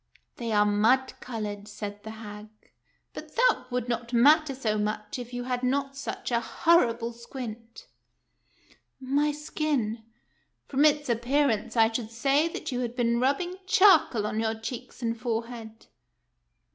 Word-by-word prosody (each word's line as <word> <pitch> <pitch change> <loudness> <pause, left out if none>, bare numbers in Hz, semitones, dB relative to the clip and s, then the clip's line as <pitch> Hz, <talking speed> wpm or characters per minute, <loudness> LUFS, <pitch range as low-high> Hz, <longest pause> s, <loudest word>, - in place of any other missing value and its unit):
" - - -48
They 230 -2 -3
are 210 -1 +4
mud 225 +6 +3
colored," 210 -5 -5
said 205 -1 -7
the 220 - -9
hag; 210 -1 -9 0.3
" - - -44
but - - -10
that - - +3
would 250 -1 -2
not 235 0 -3
matter 290 +4 +5
so 215 -5 -1
much 215 +6 -3
if 245 0 -7
you 245 0 -4
had 250 0 -2
not 275 +2 0
such 275 -2 -5
a 235 - +3
horrible 235 -3 +2
squint." 230 -1 -9 0.6
" - - -31 0.2
My 280 +3 +1
skin 290 -7 -2 0.2
" - - -44
— - - -41
" - - -50
From 280 +2 +2
its 295 -1 +3
appearance, 240 -1 +1
I 225 0 +5
should 225 -1 -3
say 275 +7 +2
that 330 - -5
you 250 - -2
had 240 -1 -3
been 235 -1 +1
rubbing 285 +8 0
charcoal 350 - +5
on 215 +1 -2
your 225 0 0
cheeks 240 +3 -7
and 230 0 0
forehead." 230 -1 -5
240 Hz, 170 wpm, -27 LUFS, 225-275 Hz, 0.6 s, matter